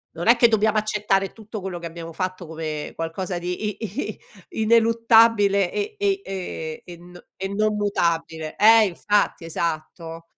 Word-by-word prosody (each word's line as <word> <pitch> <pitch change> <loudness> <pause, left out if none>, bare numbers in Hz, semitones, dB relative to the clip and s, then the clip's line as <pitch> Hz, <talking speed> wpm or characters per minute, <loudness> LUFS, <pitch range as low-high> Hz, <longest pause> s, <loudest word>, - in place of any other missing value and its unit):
Non 170 +4 -4
è 235 - +8
che 235 - +6
dobbiamo 220 -1 +2
accettare 210 -2 0
tutto 220 -1 -8
quello 185 -2 -5
che 170 - -8
abbiamo 165 0 -8
fatto, 185 0 -4
come 155 -2 -5
qualcosa 175 +3 -4
di 180 +4 -3
i 210 -1 -4 0.3
i - - -8 0.4
ineluttabile 225 -3 +4
e 420 +1 -3
e 400 -1 +1
ehm, 170 -4 -6
e 175 -1 -11
n 175 +1 -15
e 190 - -4
non 215 +1 +1
mutabile 165 -6 -1
eh 220 +1 +7
infatti, 200 -1 0
esatto. 165 0 -4
190 Hz, 155 wpm, -23 LUFS, 170-215 Hz, 0.4 s, è